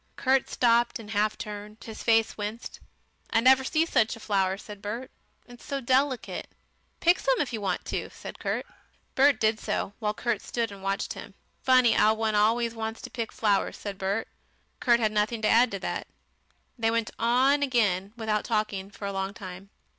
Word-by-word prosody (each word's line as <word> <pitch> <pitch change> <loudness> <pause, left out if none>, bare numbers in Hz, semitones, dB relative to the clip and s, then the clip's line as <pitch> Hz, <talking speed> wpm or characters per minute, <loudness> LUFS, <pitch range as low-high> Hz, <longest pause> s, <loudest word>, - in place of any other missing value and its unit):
Kurt 265 0 +2
stopped 235 -1 +3
and 220 -2 -10
half 215 0 +1
turned. 210 0 -7
His 220 -1 -8
face 225 -1 +3
winced. 210 +3 -6 0.5
"I - - +3
never 260 +2 +6
see 315 +4 +2
such 225 -9 +2
a - - -12
flower," 195 -3 0
said 205 0 -10
Bert. 230 +6 -5 0.3
"It's 245 -1 -14
so 280 -2 -3
delicate." 260 0 0 0.5
"Pick 345 +2 +4
some - - +2
more - - +2
if 250 -4 -8
you 220 - -3
want 200 - -2
to," - - -3
said - - -10
Kurt. - - -2 0.5
Bert 275 -2 +4
did 220 0 +2
so, 200 - -2
while 210 -2 -1
Kurt 240 +2 -1
stood 230 -2 -2
and 200 -1 -10
watched 195 +1 -2
him. - - -10 0.3
"Funny 255 -3 +5
'ow 215 +1 +4
one 220 0 0
always 225 +3 +2
wants 225 0 -4
to - - -7
pick 230 -2 -4
flowers," 205 -3 +1
said 200 -2 -6
Bert. 200 +3 -1 0.5
Kurt 235 -1 +4
had 215 -2 +1
nothing 215 +2 0
to - - +4
add 240 +2 +5
to 200 - -4
that. 195 - -4 0.7
They 225 0 +2
went 230 -1 0
on 255 +5 +3
again, 205 -8 +1
without 215 -2 0
talking, 215 -3 -1
for 200 0 -8
a 200 - -3
long 195 +1 -3
time. 190 -1 -9
225 Hz, 190 wpm, -27 LUFS, 210-240 Hz, 0.7 s, never